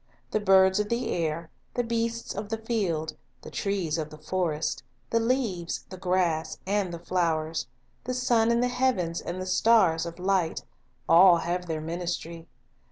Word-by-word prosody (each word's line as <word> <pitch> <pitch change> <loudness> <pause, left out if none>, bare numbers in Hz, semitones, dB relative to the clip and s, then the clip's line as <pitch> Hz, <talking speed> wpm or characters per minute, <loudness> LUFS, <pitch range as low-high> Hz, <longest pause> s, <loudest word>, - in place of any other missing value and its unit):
The 215 - +1
birds 190 -1 +5
of 210 0 -1
the 235 0 -1
air, 165 -1 -2 0.2
the 245 - +1
beasts 230 0 -2
of 205 +1 -5
the 225 - -1
field, 195 -9 -2 0.3
the - - -9
trees 185 -6 -1
of 155 -1 -3
the 155 - -11
forest, 160 -1 -2 0.3
the 230 - +3
leaves, 225 -8 -1
the 185 - -7
grass, 175 -3 0
and 200 -2 0
the 170 - -5
flowers, 165 -2 -1 0.4
the 255 +1 -2
sun 235 -2 +2
in 235 0 +3
the 250 - +2
heavens 245 -10 0
and 175 +2 -5
the 185 - -4
stars 185 -5 +3
of 170 - -8
light, 185 -3 0 0.2
— 125 -1 -41
all 175 +1 +7
have 175 +2 -2
their 160 -2 -2
ministry. 170 0 -4
185 Hz, 170 wpm, -27 LUFS, 165-225 Hz, 0.4 s, all